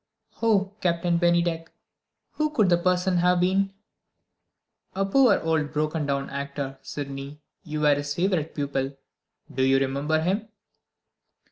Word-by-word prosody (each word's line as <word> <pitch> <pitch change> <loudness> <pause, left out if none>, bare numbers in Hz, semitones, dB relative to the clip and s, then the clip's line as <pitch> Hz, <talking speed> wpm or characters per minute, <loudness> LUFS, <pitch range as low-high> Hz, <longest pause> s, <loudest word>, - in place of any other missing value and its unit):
"Oh, 205 -4 +2
Captain 170 -1 +1
Bennydeck, 170 -1 +1 0.6
who 305 0 0
could 220 -11 +2
the 175 - +5
person 180 +1 +1
have 180 +1 +3
been?" 190 +2 +2 1.2
"A 195 +1 +1
poor 245 +2 +4
old 160 -2 0
broken 155 0 -1
down 140 -1 -1
actor, 140 -1 -5
Sydney. 140 0 -7 0.2
You 155 -2 -4
were 150 -1 +5
his 145 0 -3
favorite 175 -4 0
pupil. 140 -1 -2 0.6
Do 130 - -1
you 135 +1 +4
remember 140 +4 0
him?" 195 +7 -1
165 Hz, 130 wpm, -25 LUFS, 140-185 Hz, 1.2 s, the